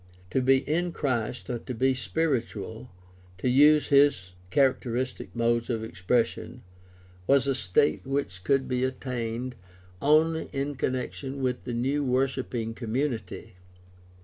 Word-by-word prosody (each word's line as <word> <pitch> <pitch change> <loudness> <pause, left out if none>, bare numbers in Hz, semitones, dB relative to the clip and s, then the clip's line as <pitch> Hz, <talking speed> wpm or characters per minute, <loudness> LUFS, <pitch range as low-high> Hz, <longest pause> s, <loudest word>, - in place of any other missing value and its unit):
To 130 - +2
be 130 +1 +3
"in 170 +3 0
Christ," 120 -4 -2
or 120 -2 -3
to 125 +1 -6
be 130 +3 +2
"spiritual" 120 -5 -2 0.3
— 90 0 -26
^to 125 +6 0
use 150 +2 +6
his 140 -11 +4 0.2
characteristic 130 -2 0
modes 115 0 +1
of 115 -2 -1
expression 115 +5 -1 0.3
— 90 0 -26
was 140 -1 +4
a 140 - +2
state 110 +3 +1
which 135 -10 -3
could 135 +3 +2
be 125 0 0
attained 125 -2 -3 0.5
only 160 +2 +3
in 140 +1 -2
connection 130 +1 -3
with 130 -2 -2
the 125 - -3
new 135 +5 0
worshiping 130 -3 -1
community. 115 -4 -3
125 Hz, 135 wpm, -27 LUFS, 115-135 Hz, 0.5 s, use